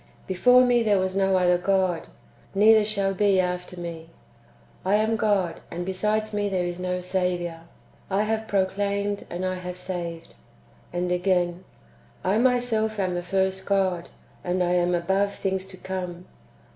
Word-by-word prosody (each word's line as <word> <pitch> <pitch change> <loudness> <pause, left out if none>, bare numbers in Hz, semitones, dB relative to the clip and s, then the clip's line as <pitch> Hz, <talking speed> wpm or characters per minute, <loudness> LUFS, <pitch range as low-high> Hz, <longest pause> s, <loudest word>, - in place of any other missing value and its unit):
Before 250 +7 +5
me 245 -1 +3
there 210 -3 +3
was 185 0 -1
no 195 -1 +3
other 180 -1 +3
God, 185 -2 +1 0.5
neither 215 +2 +6
shall 200 -2 0
be 195 0 +3
after 180 0 -2
me. 165 -1 -7 0.7
I 190 +2 +2
am 220 +1 +2
God, 200 -6 +1
and 175 +1 -4
besides 210 +3 -1
me 205 0 0
there 185 -2 0
is 175 0 -4
no 180 0 -2
Saviour. 180 -2 -1 0.5
I 200 +2 +2
have 220 0 -2
proclaimed, 200 +1 -1
and 180 +2 -3
I 185 0 -1
have 180 0 -6
saved." 170 -3 -5
^ - - -16 0.6
And 180 0 -2
again: 180 0 0 0.3
" - - -30
I 215 - +3
myself 235 -3 +1
am 185 -2 0
the 175 - -2
first 190 +1 -1
God, 185 -3 +1 0.3
and 180 0 0
I 175 - +1
am 175 0 +2
above 190 +4 0
things 190 -1 -2
to 190 -1 -10
come." 180 -1 -5
190 Hz, 165 wpm, -25 LUFS, 180-205 Hz, 0.7 s, neither